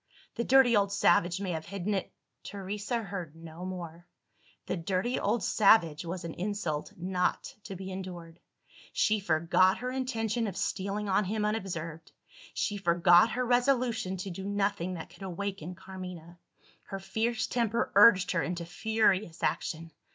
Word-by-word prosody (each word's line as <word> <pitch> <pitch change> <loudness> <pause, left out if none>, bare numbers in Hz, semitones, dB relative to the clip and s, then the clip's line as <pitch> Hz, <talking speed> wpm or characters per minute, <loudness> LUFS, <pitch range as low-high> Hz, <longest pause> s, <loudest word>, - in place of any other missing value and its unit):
"The 235 - -2
dirty 255 -1 +5
old 200 -1 +2
savage 175 -2 +3
may 195 -2 -2
have 160 -1 -4
hidden 200 +2 -2
it 195 - -2 0.2
" - - -52
Teresa 205 +4 -4
heard 180 -6 -6
no 165 +1 -10
more. 175 -2 -7 0.6
"The - - -2
dirty 190 +7 -1
old 220 +3 0
savage" 175 -7 +4
was 175 +1 -5
an 165 -1 -5
insult 175 -6 -3
not 180 0 -1
to 195 - -6
be 190 +1 -7
endured! 175 -3 -7 0.5
She 215 0 +2
forgot 180 +1 +3
her 250 0 -4
intention 235 -3 -1
of 195 -2 -5
stealing 200 +2 -2
on 195 +1 +2
him 210 +2 -1
unobserved; 170 -7 -4 0.4
she 205 - -1
forgot 175 +3 +5
her 250 +1 0
resolution 245 -6 +1
to 185 +1 -5
do 190 +2 -6
nothing 195 -3 -1
that 165 -1 -8
could 175 - -17
awaken 190 -2 -5
Carmina. 180 -2 -9 0.5
Her 195 - -5
fierce 225 +4 -1
temper 235 -1 0
urged 200 -3 +7
her 170 - +1
into 175 0 -3
furious 200 -2 0
action. 165 -1 -2
190 Hz, 155 wpm, -30 LUFS, 175-210 Hz, 0.6 s, urged